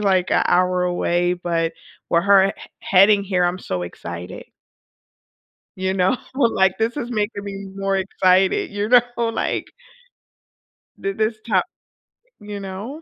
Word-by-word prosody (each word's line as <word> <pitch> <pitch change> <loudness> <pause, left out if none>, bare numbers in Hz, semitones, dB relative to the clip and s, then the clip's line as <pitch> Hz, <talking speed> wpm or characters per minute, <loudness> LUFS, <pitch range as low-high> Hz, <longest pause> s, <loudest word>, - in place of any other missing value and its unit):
like, 190 -3 +1
a - - +3
hour 180 0 +2
away, 175 0 0
but 170 -2 -1 0.4
where 170 - +3
her 195 -1 +5
he 195 - -2 0.3
heading 200 +2 +5
here, 185 -2 +1
I'm 175 +1 0
so 90 -1 -4
excited. 85 +1 -8 1.3
You 190 0 -1
know, 190 +6 +2 0.2
like, 195 -8 +2
this 225 +5 -1
is 245 -3 -4
making 205 -2 -2
me 195 0 -6
more 195 0 -1
excited, 190 0 +2
you 205 +1 -2
know, 245 -1 +7 0.2
like 230 -1 -2 1.3
the 195 0 -3
this 215 +1 -1
top 195 -4 +3 0.8
You 205 -1 -7
know? 205 +11 -7
195 Hz, 140 wpm, -21 LUFS, 180-210 Hz, 1.3 s, know